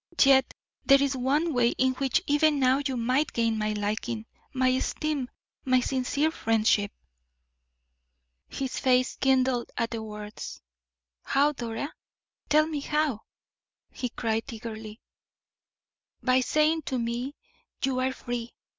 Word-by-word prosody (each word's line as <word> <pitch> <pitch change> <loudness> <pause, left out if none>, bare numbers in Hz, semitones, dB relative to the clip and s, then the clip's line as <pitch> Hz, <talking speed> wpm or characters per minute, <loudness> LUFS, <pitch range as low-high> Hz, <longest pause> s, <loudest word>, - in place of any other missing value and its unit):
"Yet 270 -1 +4 0.3
there 275 0 +6
is 275 -1 0
one 290 +6 +1
way 240 -1 +3
in 260 0 +3
which 275 +7 0
even 295 0 +3
now 260 +1 +3
you 260 -2 -2
might 255 +6 +1
gain 230 -2 +1
my 215 0 0
liking, 215 +2 -3 0.3
my 260 -1 +2
esteem, 265 +1 -1 0.3
my 255 -1 +3
sincere 270 +4 0
friendship." 220 -6 +2 1.6
His 265 -1 -4
face 255 -1 +2
kindled 260 -2 +2
at 230 - -1
the 230 -1 -3
words. 210 -1 -7 0.6
"How, 285 +2 +2
Dora? 240 +1 -5 0.6
Tell 305 +1 +5
me 310 -2 -3
how!" 295 -5 0 0.7
he 250 - -4
cried, 225 -1 -2
eagerly. 220 -1 -8 1.2
"By 255 0 +4
saying 305 +5 +2
to 260 - -1
me: 240 +4 -3 0.5
'You 260 -1 +1
are 260 +1 +1
free. 240 -2 -5
255 Hz, 130 wpm, -27 LUFS, 230-275 Hz, 1.6 s, there